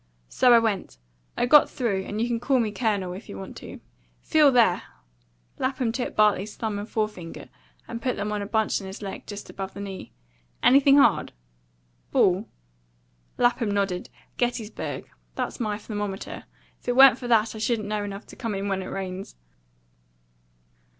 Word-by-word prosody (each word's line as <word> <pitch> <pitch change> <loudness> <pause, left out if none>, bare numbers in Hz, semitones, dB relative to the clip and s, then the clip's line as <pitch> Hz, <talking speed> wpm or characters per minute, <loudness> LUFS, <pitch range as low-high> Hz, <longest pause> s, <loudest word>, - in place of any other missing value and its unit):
So 250 - +4
I 235 - +9
went. 210 - -1 0.4
I - - +2
got 295 +4 +7
through; 210 -9 -1
and 210 - -4
you 230 - +1
can 235 -1 -1
call 260 +2 +2
me 220 -3 0
Colonel, 205 -5 -1
if 195 +4 -10
you - - -7
want 190 - -8
to. - - -9 0.4
Feel 305 -3 +5
there!" 230 -8 +4 0.8
Lapham 260 -3 0
took 245 +2 -3
Bartley's 210 -1 +2
thumb 215 -3 -3
and 205 +2 -7
forefinger 210 -6 -4 0.4
and 235 0 -6
put 250 0 -1
them 210 +1 -3
on 210 -1 -2
a 200 - -4
bunch 220 -1 +1
in 195 - -8
his 190 +2 -8
leg, 195 - -7
just 205 -1 -7
above 195 0 -6
the - - -7
knee. 195 -2 -7 0.5
"Anything 275 +1 +6
hard?" 280 - +4 0.8
"Ball?" 185 +4 +2 0.9
Lapham 240 -2 +2
nodded. 200 -3 -1 0.3
"Gettysburg. 240 -3 -3 0.3
That's - - -3
my 210 -3 -1
thermometer. 205 -2 -5 0.3
If - - -25
it 245 - +1
wa'n't 265 -2 +8
for 245 - -5
that, 225 -2 +3
I 220 - -8
shouldn't 220 -1 0
know 210 0 -2
enough 200 0 -6
to - - -13
come 230 -5 -3
in 195 +1 -3
when 195 -1 -1
it 185 - -6
rains." 190 0 -6
215 Hz, 175 wpm, -25 LUFS, 200-240 Hz, 0.9 s, I